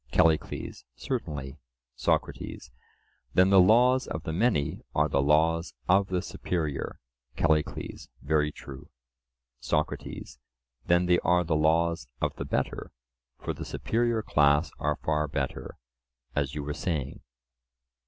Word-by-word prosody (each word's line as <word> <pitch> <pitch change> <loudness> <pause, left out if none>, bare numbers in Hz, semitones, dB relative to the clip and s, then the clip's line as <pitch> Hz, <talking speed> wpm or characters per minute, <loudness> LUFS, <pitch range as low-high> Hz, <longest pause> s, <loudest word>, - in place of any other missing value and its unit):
CALLICLES: 80 -2 +1
Certainly. 75 - -4 0.4
SOCRATES: - - -2 0.6
Then 95 +1 +5
the 95 - +7
laws 125 +7 +5
of 80 - -5
the 80 - -3
many 90 -7 +1
are 75 +1 +3
the 70 - +1
laws 80 +4 +2
of 95 +2 +4
the 90 -2 -1
superior? 80 -6 -3 0.4
CALLICLES: 80 -1 -1
Very 75 0 +1
true. 65 -2 -11 0.7
SOCRATES: 75 -4 -3 0.5
Then 85 +1 +4
they 90 0 +4
are 90 +1 +3
the 80 -2 0
laws 80 -2 +2
of - - -1
the - - -4
better; - - -2 0.5
for - - -4
the - - -7
superior 115 -1 0
class 75 -2 +3
are - - 0
far 75 -1 +1
better, 70 -2 -4 0.6
as 70 -1 -1
you 75 - -3
were 75 +1 -3
saying? 75 -4 -3
80 Hz, 125 wpm, -28 LUFS, 75-90 Hz, 0.7 s, the